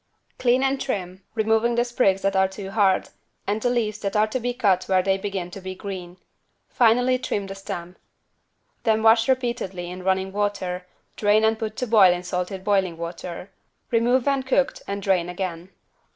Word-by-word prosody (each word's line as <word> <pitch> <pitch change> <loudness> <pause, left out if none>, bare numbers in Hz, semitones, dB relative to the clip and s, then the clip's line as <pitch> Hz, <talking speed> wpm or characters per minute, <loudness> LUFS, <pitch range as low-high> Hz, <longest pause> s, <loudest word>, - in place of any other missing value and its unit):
Clean 250 +1 +3
and 270 0 0
trim, 190 -7 -4
removing 225 +2 +2
the 240 0 +2
sprigs 195 -6 +1
that 195 0 +1
are 190 0 +4
too 190 0 -8
hard, 195 -3 +2 0.4
and 210 +2 -1
the 245 - +1
leaves, 220 -4 -1
that 200 0 -3
are 210 0 +4
to 220 +4 -3
be 245 +1 -1
cut 200 -7 +1
where 185 -1 +2
they 195 0 +2
begin 190 -2 -4
to 195 - -8
be 185 0 -6
green. 185 -3 -7 0.5
Finally 245 +1 +3
trim 205 -5 -2
the 195 - -6
stem. 180 -2 -7 0.9
Then 220 -1 +1
wash 225 +2 +5
repeatedly 235 -9 -1
in 185 +1 -7
running 190 +1 0
water, 190 -3 -2 0.3
drain 210 +1 +3
and 220 0 +2
put 220 -1 -4
to 250 - -1
boil 210 -6 +6
in 175 0 -2
salted 180 +1 -3
boiling 190 -4 +1
water. 170 +2 -7 0.4
Remove 240 +2 +2
when 275 -1 +2
cooked 265 +1 0
and 200 0 -4
drain 180 -3 +1
again. 180 -1 -5
200 Hz, 180 wpm, -24 LUFS, 185-230 Hz, 0.9 s, boil